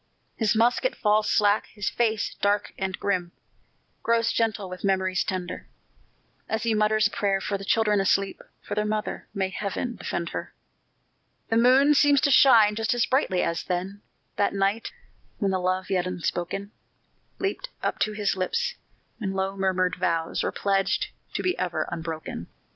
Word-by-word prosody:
His 220 -1 +1
musket 245 - +2
falls 210 0 +2
slack; 210 0 +3
his 205 -2 -6
face, 220 -3 0
dark 205 0 +1
and 190 -1 -3
grim, 180 -3 -1 0.7
Grows 230 0 +2
gentle 220 -3 0
with 185 0 -8
memories 190 -2 +1
tender, 185 -2 -4 0.8
As 220 0 -1
he 230 -1 +1
mutters 215 0 +3
a 205 - +2
prayer 195 -1 0
for 200 - -2
the 195 - -5
children 210 0 +2
asleep 195 0 +1 0.2
For - - -5
their 210 0 +1
mother 215 0 -3
may 190 -1 0
Heaven 210 +5 -3
defend 170 0 -3
her! - - -6 0.9
The 225 - +2
moon 260 +5 +6
seems 285 -1 +5
to 285 - +3
shine 225 -7 +7
just 225 +2 0
as 240 - +2
brightly 255 -9 +1
as 170 - -1
then, 185 +3 -3 0.4
That 200 0 +1
night, 200 +3 0 0.5
when 200 -3 0
the 190 - 0
love 185 +1 -1
yet 180 -1 +1
unspoken 180 +2 -3 0.7
Leaped 400 +6 -3
up - - -1
to 215 - +1
his 210 -2 0
lips 470 - -1 0.5
when 195 -4 -2
low 190 0 -1
murmured 185 -2 0
vows 165 -1 0
Were - - -1
pledged 195 -1 0 0.3
to - - -1
be 365 0 +1
ever 180 -2 -1
unbroken. 160 - -5
200 Hz, 165 wpm, -26 LUFS, 185-225 Hz, 0.9 s, shine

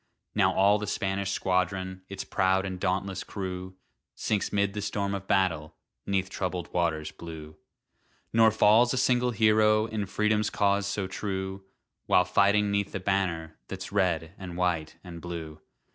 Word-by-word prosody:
Now - - +3
all 100 +2 +4
the 105 - -4
Spanish 100 -1 -1
squadron, 95 0 -1
Its 100 -1 -5
proud 95 0 +1
and 95 -1 -5
dauntless 95 +1 -1
crew, 95 -1 -6 0.4
Sinks 105 -2 -1
'mid 100 -1 +1
the 105 - -3
storm 100 -1 -2
of 100 -1 -5
battle, 80 -5 +1 0.3
'Neath 95 -1 +1
troubled 90 -3 -4
waters 80 -3 0
blue. 80 -2 -9 0.8
Nor 115 0 +6
falls 110 +4 +4
a - - -2
single 125 0 +2
hero 110 -1 +4
In 110 -3 -3
Freedom's 105 +1 +1
cause 100 -1 +1
so 100 -1 -2
true, 95 0 -4 0.4
While 90 - +4
fighting 100 +1 +3
'neath 100 0 -1
the - - -2
banner 90 -4 -1
That's 95 0 -7
red 90 -4 0
and 90 -2 -7
white 85 -4 -1
and 85 -2 -9
blue. 80 -3 -7
95 Hz, 155 wpm, -28 LUFS, 90-100 Hz, 0.8 s, Nor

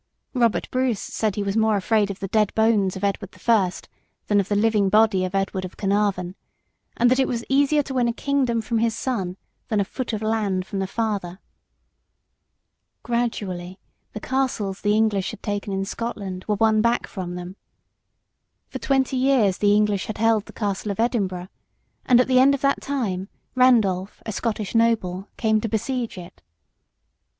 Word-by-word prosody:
Robert 235 -4 +1
Bruce 255 -5 0
said 215 -3 -2
he 205 - -1
was 200 0 -2
more 220 -1 +3
afraid 205 +1 +1
of 195 - -6
the 195 - -4
dead 210 +1 +2
bones 220 -4 +2
of 190 - -7
Edward 200 -1 -2
the - - -17
First 205 -6 +1 0.4
than 205 -1 +2
of 195 - -1
the 205 - +1
living 210 -2 +2
body 210 -2 +4
of 185 +1 -5
Edward 195 -1 -1
of 185 - -8
Caernarvon, 195 -3 0 0.6
and 245 +1 +4
that 255 - +3
it 265 - +3
was 235 -2 -3
easier 285 +2 +3
to 270 - -6
win 250 -2 +2
a - - +2
kingdom 255 -2 0
from 230 0 -1
his 225 0 +1
son 195 -8 -3 0.3
than 215 - 0
a 200 - +1
foot 250 +5 -4
of 220 -1 -3
land 210 -4 0
from 195 0 -4
the 190 - -1
father. 200 -5 -2 1.7
Gradually 200 -7 -2 0.4
the - - -5
castles 235 -7 -2
the 210 0 +2
English 215 -3 +1
had - - -10
taken 205 -1 -3
in 195 0 -1
Scotland 195 -4 -5
were 210 - +1
won 220 +1 +3
back 235 +2 +1
from 180 -3 -6
them. 180 +1 -7 1.1
For - - -6
twenty 265 -2 +1
years 255 -8 +3
the 205 0 +4
English 210 -2 +1
had 215 - -5
held 225 -1 +2
the - - -10
Castle 205 -1 -3
of 200 - -4
Edinburgh, 190 -6 -1 0.6
and 250 -2 +6
at 250 - +3
the 255 -1 +4
end 275 +2 +5
of 275 - -8
that 275 0 +1
time, 210 -9 -2 0.2
Randolph, 215 -7 +2
a 220 - -3
Scottish 215 -1 -3
noble, 210 -5 +1
came 220 -1 +2
to 225 - -2
besiege 235 +1 -2
it. 180 0 -11
215 Hz, 185 wpm, -23 LUFS, 195-235 Hz, 1.7 s, and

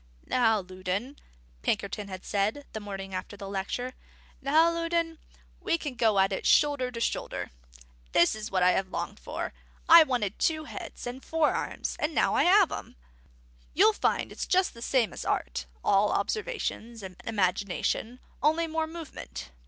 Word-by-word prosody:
"Now, 225 -4 +3
Loudon," 185 +8 -4 0.4
Pinkerton 200 - -1
had 185 -1 -8
said, 210 +8 0
the 220 - -3
morning 195 -2 -7
after 185 +2 -5
the 200 - -7
lecture, 200 +6 -3 0.5
"now 315 +5 +4
Loudon, 335 -1 -1 0.4
we 335 - +1
can 295 -5 -5
go 225 -4 +2
at 195 0 +4
it - - -3
shoulder 285 -4 +4
to 240 -2 -6
shoulder. - - -2 0.6
This 170 - +5
is 215 +1 -5
what 185 -3 +1
I 180 - +6
have 190 0 0
longed - - -4
for: - - -5 0.3
I 335 0 +11
wanted 245 -9 0
two 315 -1 +1
heads - - -8
and 245 +2 -6
four 320 -2 +2
arms; - - -3
and 300 +1 -1
now - - +3
I - - +3
have 385 0 +6
'em. - - -6 0.8
You'll 425 +7 +6
find - - 0
it's - - -5
just 370 0 +2
the 230 - -12
same 240 -2 +1
as - - -6
art - - -2 0.2
all 205 +1 +4
observation 240 - -2
and 185 -1 -8
imagination; 205 +3 -1 0.2
only 315 +3 +3
more 320 0 -1
movement. 295 - -8
235 Hz, 165 wpm, -28 LUFS, 195-315 Hz, 0.8 s, I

